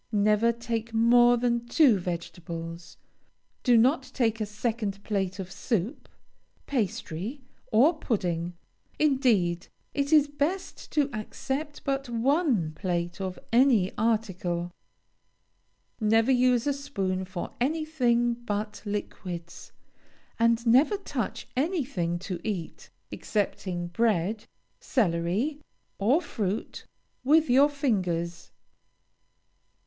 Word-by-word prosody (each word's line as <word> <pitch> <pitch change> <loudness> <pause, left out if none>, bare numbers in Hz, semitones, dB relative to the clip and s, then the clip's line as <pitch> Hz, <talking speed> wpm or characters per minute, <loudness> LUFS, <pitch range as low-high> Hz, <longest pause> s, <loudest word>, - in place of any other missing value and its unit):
Never 210 +2 +3
take 230 -1 -4
more 240 +1 +6
than 235 0 0
two 245 - +5
vegetables; 170 -1 -6 0.6
do 245 -3 +5
not 260 +5 +4
take 225 -3 +1
a 215 - -1
second 210 -2 -3
plate 190 -3 -1
of 190 -2 -6
soup, 225 - -2 0.6
pastry, 225 - -3 0.3
or 295 +9 +4
pudding. 175 - -1 0.4
Indeed, 230 - +2 0.3
it 280 +1 -1
is 300 -2 +6
best 290 +6 -3
to 295 -3 +3
accept 270 +7 -4
but 275 -2 -2
one 240 - +1
plate 175 +2 -3
of 185 -1 -4 0.2
any 235 -7 +4
article. 190 -6 -1 1.3
Never 225 +3 +3
use 250 -1 +3
a 285 - +2
spoon 195 -10 -2
for 185 -1 -6
anything 255 -5 +1
but 210 -3 -4
liquids, 185 -4 -6 0.7
and 230 +1 +3
never 265 - +5
touch 285 - -4
anything 260 - -1
to 180 -4 -4
eat, 190 -7 -5 0.2
excepting 185 -4 -2
bread, 210 0 0 0.3
celery, 215 - 0 0.4
or 255 - +3
fruit, 205 - -4 0.4
with 300 +1 +4
your 275 +4 +6
fingers. 180 - -1
225 Hz, 100 wpm, -27 LUFS, 185-265 Hz, 1.3 s, more